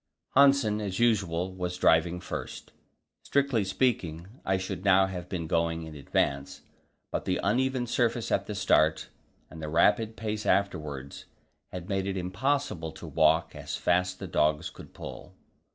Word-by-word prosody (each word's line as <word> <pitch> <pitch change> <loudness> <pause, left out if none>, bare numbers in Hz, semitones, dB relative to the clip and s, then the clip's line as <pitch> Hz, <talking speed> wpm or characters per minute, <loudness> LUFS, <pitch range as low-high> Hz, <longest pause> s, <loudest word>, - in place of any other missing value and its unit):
Hanssen, 135 -6 +5
as 95 -3 -3
usual, 95 -6 +1
was 90 -1 -4
driving 85 0 +3
first. 90 - -7 0.5
Strictly 140 -6 +1
speaking, 95 -5 0 0.2
I 95 0 +1
should 95 -1 -5
now 95 -1 +5
have 90 -2 -6
been 85 -4 -3
going 80 0 0
in 80 -1 -8
advance, 70 -1 -1 0.5
but - - -2
the 90 - 0
uneven 130 +4 +1
surface 120 -1 0
at - - +1
the 105 - -4
start 80 -5 +2 0.4
and 80 - -9
the 75 - -4
rapid 105 +7 +3
pace 110 -1 -3
afterwards 75 -8 -1 0.5
had 90 -1 -7
made 95 -1 -1
it 95 -1 -2
impossible 95 - -1
to - - -10
walk - - +2
as - - -5
fast 90 +1 +1
the - - -6
dogs 75 0 +1
could - - -13
pull. - - -9
95 Hz, 150 wpm, -28 LUFS, 85-110 Hz, 0.5 s, Hanssen